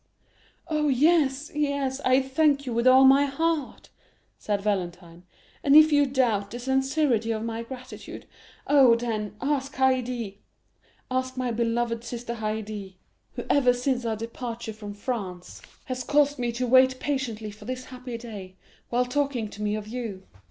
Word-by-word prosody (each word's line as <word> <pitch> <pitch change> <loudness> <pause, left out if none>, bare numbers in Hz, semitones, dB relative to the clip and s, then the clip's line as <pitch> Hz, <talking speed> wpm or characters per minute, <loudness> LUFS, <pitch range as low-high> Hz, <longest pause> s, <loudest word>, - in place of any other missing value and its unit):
"Oh, 305 -2 0
yes, 285 0 +2
yes, 280 -2 -1
I 260 0 +3
thank 280 +1 +2
you 245 - -3
with 235 +2 +1
all 260 +1 +7
my 275 +2 +6
heart," 310 +1 -2 0.5
said 205 -1 -1
Valentine; 180 -4 -3 0.4
"and 280 0 +5
if 310 0 +8
you 290 -1 +4
doubt 235 -7 +1
the 240 - -6
sincerity 265 -2 +1
of 220 -1 -2
my 230 0 -3
gratitude, 255 +2 -9 0.4
oh, 270 -5 +6
then, 220 -3 -3
ask 275 0 -1
Haydée! 250 -5 0 0.7
ask 255 0 -2
my 250 -1 -1
beloved 230 0 -1
sister 235 0 -5
Haydée, 215 -3 -5 0.4
who - - -5
ever 255 -3 +4
since 250 0 -1
our 225 -1 -1
departure 230 0 -6
from 205 -1 -8
France, 200 -6 -5 0.2
has 255 0 -4
caused 290 +1 +2
me 240 -1 0
to 250 +2 -1
wait 260 +1 +5
patiently 235 -7 -3
for 210 +1 -14
this 255 +1 -5
happy 250 -2 -7
day, 205 -6 -9 0.3
while 245 +1 +1
talking 265 -3 -1
to 205 - -10
me 210 0 0
of 215 -1 -6
you." 220 -5 -5
245 Hz, 155 wpm, -26 LUFS, 220-270 Hz, 0.7 s, if